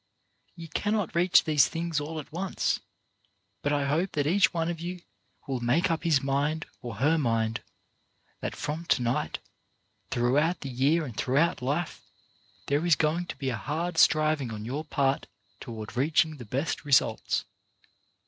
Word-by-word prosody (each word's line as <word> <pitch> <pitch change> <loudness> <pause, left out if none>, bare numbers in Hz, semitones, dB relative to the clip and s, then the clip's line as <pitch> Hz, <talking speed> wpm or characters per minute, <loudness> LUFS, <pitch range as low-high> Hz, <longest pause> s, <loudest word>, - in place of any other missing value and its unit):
You 165 -2 -8
cannot 205 +3 -1
reach 175 +1 +5
these 150 -3 +4
things 165 -2 -2
all 155 +2 -4
at 150 - -10
once, 185 +4 -1 0.8
but 145 - 0
I 145 -1 +1
hope 160 +7 0
that 145 -2 0
each 185 +6 +4
one 165 -2 -1
of 170 -1 -3
you 175 +1 -5 0.4
will 135 -2 -2
make 130 +10 +2
up 165 - -1
his 155 -5 +3
mind 145 +3 0 0.2
or 120 -3 -6
her 155 +8 +2
mind 115 -4 0 0.8
that - - -4
from 155 +3 -4
to 125 - +2
night, 120 -9 -1 0.7
throughout 140 +8 +1
the 140 - -5
year 140 +6 +2
and 120 -6 -8
throughout 145 +9 +1
life, 145 +7 -2 0.6
there 145 +3 +1
is 170 -3 +5
going 165 +4 0
to - - -5
be 135 -2 -2
a - - -2
hard 160 +7 -2
striving 155 -4 +4
on 110 -1 -6
your 140 +6 -3
part 140 -3 0 0.3
toward 110 -1 -7
reaching 155 +3 +2
the 120 - -9
best 135 +9 -2
results. 130 -6 +2
150 Hz, 165 wpm, -28 LUFS, 130-165 Hz, 0.8 s, reach